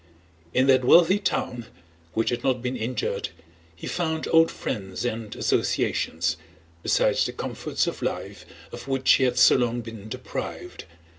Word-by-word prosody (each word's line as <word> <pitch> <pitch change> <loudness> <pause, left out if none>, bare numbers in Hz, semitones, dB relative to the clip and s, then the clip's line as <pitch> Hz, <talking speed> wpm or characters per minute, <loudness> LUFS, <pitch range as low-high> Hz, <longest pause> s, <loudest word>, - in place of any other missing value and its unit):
In 130 +6 +3
that 130 -1 +4
wealthy 175 +9 +6
town, 125 - -2 0.5
which 115 +2 +1
had 120 - -3
not 125 -2 0
been 125 +1 -2
injured, 120 0 -2 0.5
he 85 - -10
found 160 -2 -2
old 165 0 +6
friends 95 0 -5
and 115 -3 -4
associations, 80 -1 0 0.4
besides - - +2
the - - -4
comforts - - -2
of - - -4
life - - -4 0.3
of - - -9
which 135 -1 +2
he 130 - +5
had 125 -1 0
so 125 - +7
long 120 -1 0
been 110 -2 -9
deprived. - - -6
125 Hz, 150 wpm, -25 LUFS, 115-135 Hz, 0.5 s, so